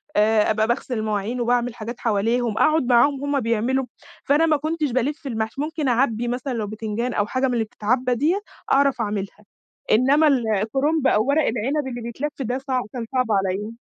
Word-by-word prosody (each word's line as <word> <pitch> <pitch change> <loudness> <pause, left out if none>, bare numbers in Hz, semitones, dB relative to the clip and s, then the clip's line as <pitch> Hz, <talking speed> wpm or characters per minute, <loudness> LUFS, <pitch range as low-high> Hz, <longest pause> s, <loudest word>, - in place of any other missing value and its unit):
آآ، 215 0 +3
أبقى 220 +1 +1
باغسل 250 +1 -2
المواعين 215 +3 -2
وباعمل 240 0 0
حاجات 235 +2 -7
حواليهم، 230 +1 0
أقعد 310 -2 +3
معاهم 265 +3 +3
وهُم 285 -1 0
بيعملوا. 235 +3 0 0.4
فأنا 295 +3 +3
ما 310 -2 +3
كنتش 310 -2 -2
بالِفّ 275 +4 -2
المحشي. 225 +2 -3
ممكن 305 -2 -2
أعبِّي 240 -1 +1
مثلًا 250 +2 -3
لو 220 -3 -2
بتنجان 220 +3 -3
أو 205 - +1
حاجة 260 +3 0
من 250 - -1
اللي 230 -2 +1
بِتتعبَّى 245 +4 0
ديّة 325 - +1 0.3
أعرف 275 -3 +3
أعملها، 205 -1 -4 0.5
إنما 275 +7 +4
ال 265 -5 +3 0.2
الكرنب 275 +6 +1
أو 215 -2 +3
ورق 295 +3 +3
العنب 265 +5 -1
اللي 245 -1 -5
بيتلف 255 +6 -4
ده 250 +1 -1
صعب 260 -2 -2
كان 240 -2 -4
صعب 255 -1 +2
عليَّ. 200 +3 -1
245 Hz, 180 wpm, -22 LUFS, 220-275 Hz, 0.5 s, إنما